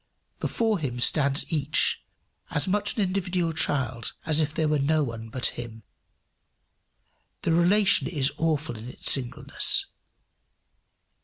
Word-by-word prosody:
Before 220 -4 0
him 125 -5 -4
stands 140 +3 +2
each, 150 -1 +1 0.5
as 150 +2 -1
much 205 +3 0
an 210 - +2
individual 180 -3 -1
child 130 -7 -1
as 155 -1 +3
if 150 -1 0
there 155 0 0
were 150 -1 +1
no 155 +2 +2
one 115 -3 -6
but 125 +1 -3 0.2
him. 115 -2 -10 1.6
The - - +1
relation 190 +4 +4
is 140 -4 +1
awful 155 -6 -1
in 115 +3 -8
its - - -2
singleness. 125 -3 +1
150 Hz, 130 wpm, -26 LUFS, 130-175 Hz, 1.6 s, relation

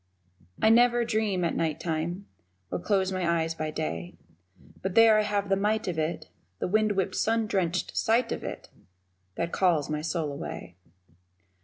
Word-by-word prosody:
I 220 - +4
never 240 +1 +5
dream 215 -5 0
at 170 - 0
night 160 -1 -1
time 170 +4 -3 0.5
Or - - -1
close 190 0 +1
my 170 -3 +1
eyes 165 0 -3
by 155 -1 -3
day, 90 - -4 0.7
But 190 -1 -3
there 225 -1 +7
I - - +4
have 205 -1 -1
the 195 - +3
might 210 +2 0
of 170 -3 -2
it, 155 +2 -2 0.3
The - - -2
wind 215 +2 +2
whipped, 190 -2 -1
sun 225 0 +1
drenched 185 -4 -1
sight 230 +1 +2
of - - -3
it, - - -6 0.7
That 170 0 -2
calls 165 -6 +2
my 150 0 -1
soul 160 -2 -2
away. 140 - -7
185 Hz, 170 wpm, -27 LUFS, 160-215 Hz, 0.7 s, there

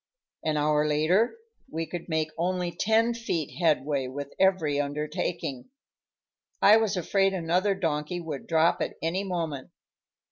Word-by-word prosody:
An 155 -1 0
hour 150 0 +2
later 175 - +2 0.3
we 165 -5 -3
could 175 +1 -7
make 160 -1 0
only 180 +1 -1
ten 225 +5 +2
feet 175 -10 -3
headway 150 -5 +1
with 140 +2 -6
every 175 -7 +3
undertaking. 145 - -3 0.9
I 210 +2 +7
was 215 -3 0
afraid 195 +2 +2
another 180 +3 +1
donkey 160 -1 -2
would 155 -5 -6
drop 165 +1 +3
at - - -2
any 175 +4 0
moment. 165 -8 -3
165 Hz, 135 wpm, -27 LUFS, 150-190 Hz, 0.9 s, I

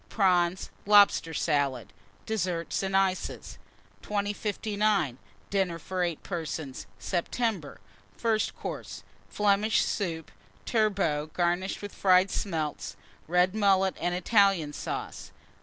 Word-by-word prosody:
Prawns. 180 -3 +2 0.2
Lobster 205 -5 +6
Salad. 140 -6 -1 0.3
DESSERTS 180 -6 -2
AND 195 0 +1
ICES. 190 -1 -1 0.4
2059. 205 - -1 0.3
DINNER 190 -4 0
FOR 185 +2 -4
8 170 -3 -2
PERSONS 160 -6 -5
(September). 190 -2 -2 0.4
FIRST 225 -2 0
COURSE. - - -7 0.3
Flemish 210 +1 +2
Soup. 165 -5 -3 0.3
Turbot, 195 -9 +1
garnished 175 +3 0
with 205 - -6
Fried 185 0 +4
Smelts. 160 -6 -3 0.3
Red 180 +2 +3
Mullet 195 -3 +3
and 175 0 0
Italian 190 -5 +3
Sauce. - - -5
185 Hz, 100 wpm, -28 LUFS, 165-205 Hz, 0.4 s, Lobster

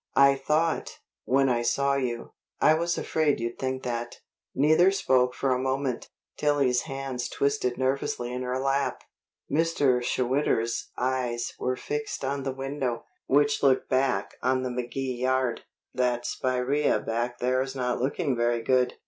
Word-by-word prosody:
"I 140 0 +7
thought, 155 +4 0 0.3
when 135 +1 +3
I 120 -2 +1
saw 140 +4 +1
you 125 -4 -2
" - - -57
"I - - +6
was 170 +2 0
afraid 155 -3 +1
you'd 115 +1 -4
think 130 0 -2
that." 120 -1 -3 0.4
Neither 155 +6 +5
spoke 130 -10 +2
for 135 -2 +1
a 125 - 0
moment. 130 -1 -2 0.3
Tillie's 140 -4 +2
hands 135 -2 -4
twisted 140 -3 0
nervously 130 -2 -1
in 125 - -3
her 125 0 -2
lap. 135 +1 0 0.5
Mr. 145 -5 +2
Schwitter's 125 -2 0
eyes 125 -2 -1
were 130 - 0
fixed 145 0 -4
on 140 +1 -1
the 135 0 -2
window, 135 -2 -3 0.2
which 145 +1 +3
looked 135 -2 +3
back 130 -6 0
on 130 +1 +1
the 130 - -2
McKee 125 +1 -3
yard. 130 -1 0 0.3
"That 125 -1 0
spiraea 130 +3 +1
back 120 +2 -2
there's 130 +2 0
not 125 -2 -1
looking 135 0 0
very 120 0 0
good. 125 0 +2
130 Hz, 150 wpm, -27 LUFS, 125-140 Hz, 0.5 s, I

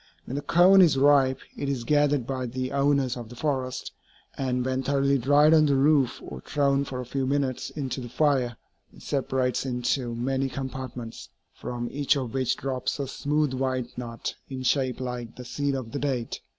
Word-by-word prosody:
When - - -6
the 145 - -2
cone 185 +5 +6
is 165 -6 +5
ripe, 135 -1 +4 0.2
it 140 - -3
is 130 -4 -2
gathered 145 -1 +2
by 130 -1 -3
the 130 +2 -3
owners 140 -2 +2
of 120 -3 -8
the 120 - -10
forest; 130 -2 -2 0.4
and 125 -2 -1
when 130 0 0
thoroughly 140 0 +2
dried 145 +5 +5
on 155 -1 +6
the 140 - +3
roof 140 -1 +3
or 65 - -8
thrown 140 - +1
for 130 -2 -5
a 125 - -4
few 130 +2 -2
minutes 135 -2 -1
into 135 -3 -4
the 120 - -7
fire, 130 -3 +1 0.3
it - - -16
separates 130 -2 0
into 125 -1 -1
many 135 +3 -1
compartments, 130 -3 -6 0.2
from 120 -1 -5
each 145 +1 +2
of 125 -4 -4
which 130 -2 0
drops 130 -2 -2
a 140 - -2
smooth 145 +1 0
white 130 -2 -2
nut 120 -1 -5 0.2
in 130 -1 -5
shape 130 -1 +1
like 125 -2 -5
the 125 - -9
seed 140 +2 -1
of 125 -4 -5
the 140 - -3
date. 130 -5 -2
130 Hz, 190 wpm, -26 LUFS, 125-140 Hz, 0.4 s, cone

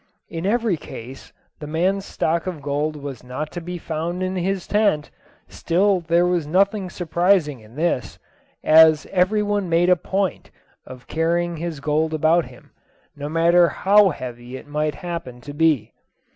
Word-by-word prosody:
In 165 +2 -4
every 225 -4 +1
case 130 -2 -10 0.3
the 150 - -7
man's 185 +6 0
stock 165 +3 -1
of 165 -6 -5
gold 145 +2 -1
was 140 -5 -8
not 130 +5 -5
to 175 - -6
be 175 +1 -6
found 170 +2 -4
in 185 0 -2
his 185 +1 -2
tent; 205 -8 +1 0.4
still 190 +3 +1
there 170 +1 +2
was 175 -4 0
nothing 195 +3 +1
surprising 170 -4 +1
in 110 +2 -17
this, 150 - -1 0.5
as 155 -1 +6
every 195 +3 +2
one 205 -3 -1
made 170 +2 +3
a - - +7
point 190 +1 -2 0.4
of 125 -1 -11
carrying 170 +1 -1
his 165 -2 -5
gold 155 +2 0
about 160 +2 +3
him, - - -16 0.4
no 145 0 -6
matter 170 +2 +4
how 200 +1 +4
heavy 125 -4 -7
it - - -12
might 150 +1 -1
happen 170 -8 -6
to 145 +3 -9
be. 150 -7 +1
165 Hz, 160 wpm, -22 LUFS, 150-180 Hz, 0.5 s, a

